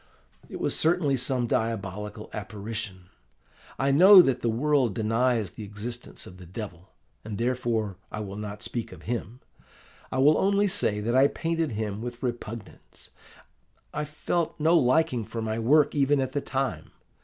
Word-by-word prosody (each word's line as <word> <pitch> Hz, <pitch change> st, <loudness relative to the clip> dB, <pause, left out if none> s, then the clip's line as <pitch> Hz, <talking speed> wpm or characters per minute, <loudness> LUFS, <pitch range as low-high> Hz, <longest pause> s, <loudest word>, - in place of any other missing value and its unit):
It -, -, -7 dB
was -, -, 0 dB
certainly 160 Hz, -4 st, +2 dB
some 125 Hz, -1 st, 0 dB
diabolical 105 Hz, -2 st, -3 dB
apparition. 105 Hz, -3 st, -6 dB, 0.7 s
I 135 Hz, +3 st, +2 dB
know 185 Hz, +6 st, +9 dB
that 135 Hz, -5 st, 0 dB
the 120 Hz, -, +1 dB
world 130 Hz, -2 st, +1 dB
denies 115 Hz, -1 st, +1 dB
the 110 Hz, -, -9 dB
existence 105 Hz, +4 st, -6 dB
of 90 Hz, -, -12 dB
the 90 Hz, -, -12 dB
Devil, 90 Hz, -2 st, -8 dB, 0.3 s
and 105 Hz, -2 st, -5 dB
therefore 115 Hz, -5 st, -1 dB
I 105 Hz, -, -4 dB
will 100 Hz, -2 st, -6 dB
not 105 Hz, 0 st, -6 dB
speak 120 Hz, -2 st, -4 dB
of 90 Hz, -3 st, -12 dB
him. 120 Hz, +1 st, -4 dB, 0.7 s
I -, -, -2 dB
will 145 Hz, +4 st, +5 dB
only 200 Hz, +1 st, +3 dB
say 145 Hz, -, 0 dB
that 120 Hz, +3 st, -1 dB
I 135 Hz, +2 st, +6 dB
painted 165 Hz, -3 st, -2 dB
him 105 Hz, -1 st, -3 dB
with 120 Hz, +1 st, -6 dB
repugnance: 115 Hz, -3 st, -7 dB, 0.8 s
I 150 Hz, -, -2 dB
felt 160 Hz, +3 st, -2 dB
no 160 Hz, +3 st, +4 dB
liking 130 Hz, -4 st, +3 dB
for 115 Hz, +2 st, -6 dB
my 110 Hz, 0 st, -2 dB
work, 145 Hz, +6 st, +4 dB
even 145 Hz, 0 st, +3 dB
at 130 Hz, -1 st, -1 dB
the 145 Hz, -, -1 dB
time. 130 Hz, -, -3 dB
120 Hz, 160 wpm, -27 LUFS, 105-140 Hz, 0.8 s, know